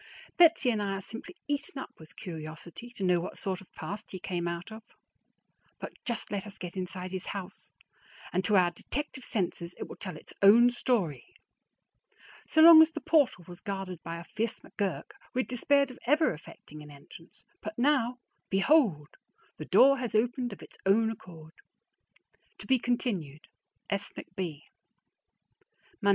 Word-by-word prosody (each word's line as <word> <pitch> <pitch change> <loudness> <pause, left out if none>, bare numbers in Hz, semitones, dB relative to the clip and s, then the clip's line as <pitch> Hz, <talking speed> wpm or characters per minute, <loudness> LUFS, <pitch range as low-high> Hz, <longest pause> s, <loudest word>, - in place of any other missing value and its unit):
Betsy 330 -7 +5
and 215 -2 -1
I 200 -1 -1
are 195 - -4
simply 230 - -8
eaten 285 -1 -3
up 265 - -6
with 160 -1 -15
curiosity 165 +6 -8
to 195 - -5
know 180 -1 +3
what 170 - -6
sort 190 -2 -3
of 190 - -18
past 205 +2 -6
he 185 - -6
came 175 -1 -3
out 170 +4 -5
of; 220 +1 -8 1.0
but - - -6
just 235 -2 -3
let 205 0 -3
us 200 - -9
get 180 0 -7
inside 185 0 -5
his 185 -1 -5
house, 195 -1 -7 0.6
and 185 +2 +1
to 210 - +3
our 180 -2 +5
detective 265 +8 -5
senses 175 -6 -2
it - - -6
will - - -9
tell 185 -5 -6
its - - -11
own 230 +5 +8
story. 240 - -1 1.1
So 315 - +5
long 330 -1 +11
as 320 - +6
the - - -4
portal 290 - +2
was 175 -1 -10
guarded 195 -4 -5
by 165 0 -6
a - - -8
fierce 220 +5 -3
McGurk, 200 -4 -4 0.2
we 255 - +3
had - - -6
despaired 275 +2 +2
of 250 - -13
ever 300 - +4
effecting 155 0 -12
an 150 - -11
entrance; 145 +4 -15 0.2
but 325 - -6
now, 250 -2 +2 0.3
behold! 195 - +3 0.5
The - - -6
door 275 0 +6
has 245 -3 -3
opened 245 +2 +1
of 200 - -10
its - - -14
own 220 +3 +3
accord. 165 -7 -12 1.0
To - - -11
be 260 -1 +3
continued. 195 - -2 0.5
S. 200 0 -1
McB. 165 -6 -5
200 Hz, 170 wpm, -30 LUFS, 175-245 Hz, 1.1 s, long